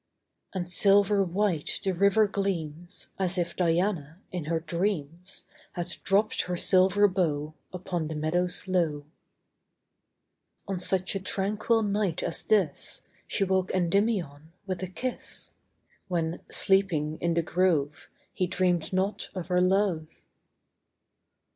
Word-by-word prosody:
5 190 Hz, -, -2 dB
And -, -, -12 dB
silver 200 Hz, +2 st, +4 dB
white 180 Hz, -3 st, 0 dB
the 195 Hz, -, +1 dB
river 200 Hz, +4 st, +4 dB
gleams, 175 Hz, -5 st, -3 dB
As 185 Hz, -1 st, 0 dB
if 170 Hz, -1 st, -1 dB
Diana, 170 Hz, -2 st, 0 dB
in 180 Hz, -4 st, -4 dB
her 165 Hz, +1 st, 0 dB
dreams, 170 Hz, +1 st, -2 dB
• -, -, -33 dB, 0.2 s
Had 175 Hz, -1 st, -4 dB
dropt 205 Hz, +3 st, +2 dB
her 180 Hz, 0 st, -2 dB
silver 190 Hz, +3 st, +5 dB
bow 155 Hz, -5 st, -1 dB, 0.2 s
Upon 175 Hz, -3 st, -3 dB
the 155 Hz, -, -5 dB
meadows 175 Hz, +5 st, 0 dB
low. 165 Hz, -6 st, 0 dB, 1.6 s
On 195 Hz, -2 st, -2 dB
such 185 Hz, +1 st, +1 dB
a 195 Hz, -, -1 dB
tranquil 210 Hz, +4 st, 0 dB
night 200 Hz, -4 st, 0 dB
as 165 Hz, -, -2 dB
this, 195 Hz, -9 st, +1 dB
io -, -, -38 dB, 0.2 s
She -, -, 0 dB
woke 190 Hz, -1 st, +1 dB
Kndymion 180 Hz, -5 st, 0 dB, 0.2 s
with 185 Hz, -2 st, -3 dB
a 185 Hz, -, -2 dB
kis^, 250 Hz, +7 st, -6 dB, 0.6 s
When, 170 Hz, -2 st, -2 dB
sleeping 170 Hz, -6 st, +1 dB
in 170 Hz, -1 st, +1 dB
tin 170 Hz, -1 st, +1 dB
grove, 160 Hz, -6 st, 0 dB, 0.2 s
He 185 Hz, -, 0 dB
dreamed 180 Hz, -3 st, 0 dB
not 190 Hz, +2 st, -1 dB
of 185 Hz, -1 st, -5 dB
her 180 Hz, 0 st, +3 dB
love. 185 Hz, -4 st, +2 dB
180 Hz, 135 wpm, -28 LUFS, 165-195 Hz, 1.6 s, silver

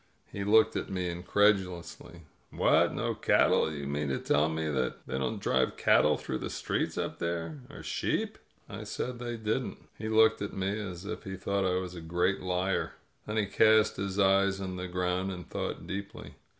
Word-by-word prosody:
He 100 Hz, -, -4 dB
looked 110 Hz, +2 st, +4 dB
at -, -, -3 dB
me 90 Hz, -2 st, -2 dB
incredulously. 90 Hz, -2 st, 0 dB, 0.3 s
"What, -, -, +3 dB
no -, -, -1 dB
cattle? -, -, +3 dB
You 70 Hz, -2 st, -5 dB
mean 70 Hz, +1 st, -2 dB
to 65 Hz, -, 0 dB
tell 75 Hz, +2 st, +2 dB
me 80 Hz, 0 st, -2 dB
that 65 Hz, -4 st, -2 dB
they 65 Hz, -, -3 dB
don't 65 Hz, -2 st, -2 dB
drive 65 Hz, 0 st, +1 dB
cattle -, -, +4 dB
through 65 Hz, -, -4 dB
the -, -, -4 dB
streets -, -, -2 dB
up -, -, -3 dB
there? 85 Hz, -3 st, -3 dB
Or -, -, -10 dB
sheep?" -, -, -2 dB, 0.3 s
I -, -, -7 dB
said 125 Hz, -1 st, -4 dB
they 120 Hz, -1 st, -4 dB
didn't. 110 Hz, -1 st, -2 dB, 0.2 s
He 110 Hz, +1 st, -3 dB
looked 110 Hz, 0 st, +4 dB
at 100 Hz, -, -3 dB
me 95 Hz, 0 st, -1 dB
as 90 Hz, -3 st, -6 dB
if 110 Hz, +1 st, -5 dB
he 95 Hz, -3 st, -5 dB
thought 100 Hz, 0 st, -1 dB
I 90 Hz, -, +1 dB
was 90 Hz, -1 st, -4 dB
a 85 Hz, -, -8 dB
great 90 Hz, +4 st, 0 dB
liar; 90 Hz, +1 st, -1 dB, 0.3 s
then 105 Hz, +1 st, -2 dB
he 105 Hz, -, +2 dB
cast 110 Hz, +2 st, +4 dB
his 95 Hz, 0 st, -3 dB
eyes 100 Hz, 0 st, +3 dB
on 95 Hz, -1 st, -4 dB
the 90 Hz, 0 st, -4 dB
ground 90 Hz, +1 st, -1 dB
and 90 Hz, -2 st, -7 dB
thought -, -, -4 dB
deeply. 100 Hz, +1 st, -6 dB
95 Hz, 190 wpm, -30 LUFS, 85-100 Hz, 0.3 s, looked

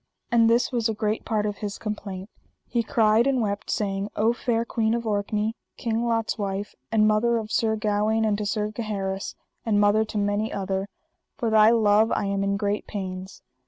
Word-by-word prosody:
And 230 Hz, -1 st, +5 dB
this 235 Hz, +1 st, +2 dB
was 235 Hz, -2 st, 0 dB
a 220 Hz, -, -1 dB
great 215 Hz, 0 st, -1 dB
part 215 Hz, -2 st, 0 dB
of 205 Hz, -1 st, -2 dB
his 205 Hz, -1 st, -5 dB
complaint: 200 Hz, -3 st, -5 dB, 0.4 s
he 235 Hz, -, 0 dB
cried 225 Hz, +1 st, +3 dB
and 270 Hz, -2 st, +2 dB
wept, 205 Hz, -3 st, -2 dB
saying: 200 Hz, -1 st, -1 dB
O 225 Hz, +3 st, +2 dB
fair 235 Hz, -1 st, -1 dB
Queen 225 Hz, -1 st, 0 dB
of 235 Hz, 0 st, -3 dB
Orkney, 210 Hz, +1 st, -1 dB, 0.2 s
King 230 Hz, 0 st, -1 dB
Lot's 225 Hz, -1 st, 0 dB
wife, 200 Hz, 0 st, -3 dB, 0.2 s
and 215 Hz, -1 st, +4 dB
mother 225 Hz, +2 st, +3 dB
of 220 Hz, -1 st, -5 dB
Sir 220 Hz, -1 st, +2 dB
Gawaine, 215 Hz, +1 st, +1 dB
and 210 Hz, -1 st, +2 dB
to 210 Hz, -, -2 dB
Sir 210 Hz, 0 st, -1 dB
Gaheris, 200 Hz, -3 st, -3 dB, 0.3 s
and 210 Hz, -3 st, +2 dB
mother 205 Hz, +1 st, +4 dB
to 215 Hz, -, -5 dB
many 205 Hz, +2 st, 0 dB
other, 195 Hz, 0 st, -2 dB, 0.5 s
for 235 Hz, -5 st, -1 dB
thy 215 Hz, 0 st, +7 dB
love 220 Hz, -1 st, +4 dB
I -, -, 0 dB
am 200 Hz, 0 st, 0 dB
in 200 Hz, 0 st, 0 dB
great 205 Hz, 0 st, -2 dB
pains. 190 Hz, -2 st, -6 dB
215 Hz, 195 wpm, -25 LUFS, 205-225 Hz, 0.5 s, thy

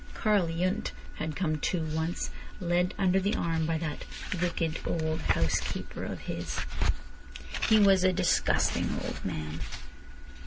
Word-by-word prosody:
Karl 210 Hz, -5 st, +3 dB
Yundt 185 Hz, +6 st, 0 dB, 0.3 s
had 155 Hz, -1 st, -2 dB
come 155 Hz, -4 st, 0 dB
too, 170 Hz, +2 st, 0 dB
once, 160 Hz, +2 st, -1 dB, 0.3 s
led 180 Hz, 0 st, +1 dB
under 190 Hz, -1 st, +4 dB
the 200 Hz, +3 st, +1 dB
arm 165 Hz, -1 st, 0 dB
by 165 Hz, 0 st, +1 dB
that 160 Hz, -2 st, -3 dB, 0.4 s
"wicked 165 Hz, -2 st, 0 dB
old 160 Hz, -1 st, -1 dB
housekeeper 80 Hz, -, 0 dB
of -, -, -5 dB
his." -, -, -3 dB, 1.1 s
He 220 Hz, -, +7 dB
was 195 Hz, -3 st, +6 dB
"a 185 Hz, -, +5 dB
disgusting 180 Hz, -1 st, +2 dB
old -, -, -4 dB
man." 75 Hz, +1 st, -3 dB
170 Hz, 130 wpm, -30 LUFS, 160-185 Hz, 1.1 s, He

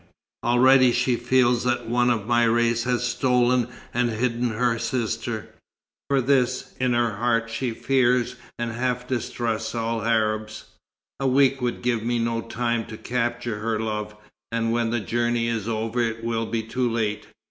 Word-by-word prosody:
Already 130 Hz, +1 st, +5 dB
she 125 Hz, 0 st, +2 dB
feels 125 Hz, 0 st, +2 dB
that 120 Hz, -2 st, -1 dB
one 120 Hz, +1 st, +2 dB
of 115 Hz, -4 st, 0 dB
my 120 Hz, +1 st, +3 dB
race 115 Hz, 0 st, +2 dB
has 125 Hz, -1 st, 0 dB
stolen 125 Hz, -1 st, +2 dB, 0.3 s
and 120 Hz, 0 st, +1 dB
hidden 120 Hz, +1 st, 0 dB
her 115 Hz, +1 st, 0 dB
sister; 115 Hz, -2 st, -2 dB, 0.6 s
for 140 Hz, -1 st, +3 dB
this, 130 Hz, -1 st, +1 dB
in 125 Hz, -1 st, +1 dB
her 120 Hz, -3 st, +1 dB
heart, 115 Hz, 0 st, 0 dB
she 125 Hz, +2 st, -2 dB
fears 125 Hz, +1 st, +1 dB, 0.2 s
and 120 Hz, -1 st, -2 dB
half 125 Hz, +1 st, -2 dB
distrusts 120 Hz, -3 st, -2 dB
all 115 Hz, 0 st, -1 dB
Arabs. 110 Hz, -1 st, 0 dB, 0.6 s
A 135 Hz, -, 0 dB
week 135 Hz, 0 st, +3 dB
would 125 Hz, -1 st, -2 dB
give 120 Hz, -2 st, +1 dB
me 120 Hz, +2 st, 0 dB
no 115 Hz, 0 st, -1 dB
time 115 Hz, 0 st, -1 dB
to 110 Hz, -, -9 dB
capture 120 Hz, -2 st, -2 dB
her 110 Hz, 0 st, -1 dB
love, 105 Hz, -1 st, -3 dB, 0.4 s
and 115 Hz, 0 st, 0 dB
when 115 Hz, -1 st, +1 dB
the 120 Hz, +1 st, 0 dB
journey 120 Hz, +1 st, 0 dB
is 115 Hz, -3 st, -2 dB
over 115 Hz, +2 st, -1 dB
it 115 Hz, -1 st, -2 dB
will 115 Hz, -1 st, -1 dB
be 115 Hz, -1 st, -2 dB
too 120 Hz, +2 st, -1 dB
late. 105 Hz, -2 st, -2 dB
120 Hz, 165 wpm, -24 LUFS, 115-125 Hz, 0.6 s, Already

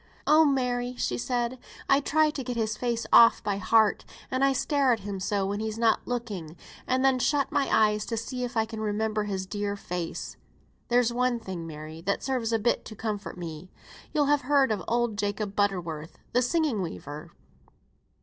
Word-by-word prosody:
"Oh 310 Hz, +1 st, +6 dB
Mary!" 250 Hz, -3 st, 0 dB
she 120 Hz, -, -1 dB
said, 245 Hz, -, -1 dB, 0.3 s
"I 275 Hz, -, +5 dB
try 305 Hz, +2 st, +2 dB
to 280 Hz, -3 st, -5 dB
get 245 Hz, -1 st, -4 dB
his 220 Hz, -1 st, 0 dB
face 235 Hz, 0 st, -2 dB
off 230 Hz, -, +7 dB
by 200 Hz, -1 st, -1 dB
heart, 215 Hz, +2 st, +3 dB, 0.3 s
and 260 Hz, +1 st, +1 dB
I 275 Hz, -, +5 dB
stare 275 Hz, 0 st, +2 dB
at 225 Hz, -3 st, +1 dB
him 200 Hz, -1 st, -5 dB
so 195 Hz, +1 st, 0 dB
when 200 Hz, +1 st, -2 dB
he's 220 Hz, 0 st, -3 dB
not 230 Hz, -1 st, +2 dB
looking, 205 Hz, -10 st, -4 dB, 0.3 s
and 260 Hz, +1 st, +2 dB
then 265 Hz, -1 st, +4 dB
shut 285 Hz, +2 st, +1 dB
my 285 Hz, -2 st, +1 dB
eyes 210 Hz, -1 st, +3 dB
to 230 Hz, -, -2 dB
see 250 Hz, +3 st, -4 dB
if 245 Hz, 0 st, -4 dB
I 220 Hz, -, +3 dB
can 220 Hz, 0 st, -7 dB
remember 215 Hz, 0 st, -1 dB
his 190 Hz, -2 st, -3 dB
dear 205 Hz, +1 st, -3 dB
face. 180 Hz, -4 st, -5 dB, 0.5 s
There's 240 Hz, -1 st, +3 dB
one 250 Hz, 0 st, +1 dB
thing, 180 Hz, -6 st, -6 dB
Mary, 155 Hz, +1 st, -8 dB
that 200 Hz, +4 st, -1 dB
serves 250 Hz, -4 st, -1 dB
a 225 Hz, -, +3 dB
bit 225 Hz, +2 st, +1 dB
to 215 Hz, -, -9 dB
comfort 210 Hz, -3 st, -4 dB
me. 165 Hz, 0 st, -7 dB, 0.4 s
You'll 295 Hz, -1 st, +2 dB
have 290 Hz, 0 st, +3 dB
heard 275 Hz, -1 st, +3 dB
of 205 Hz, -5 st, -1 dB
old 235 Hz, -3 st, 0 dB
Jacob 205 Hz, 0 st, -2 dB
Butterworth, 170 Hz, -6 st, -1 dB, 0.2 s
the 250 Hz, -, +4 dB
singing 275 Hz, -, +1 dB
weaver? 150 Hz, -3 st, -6 dB
225 Hz, 190 wpm, -27 LUFS, 200-250 Hz, 0.5 s, off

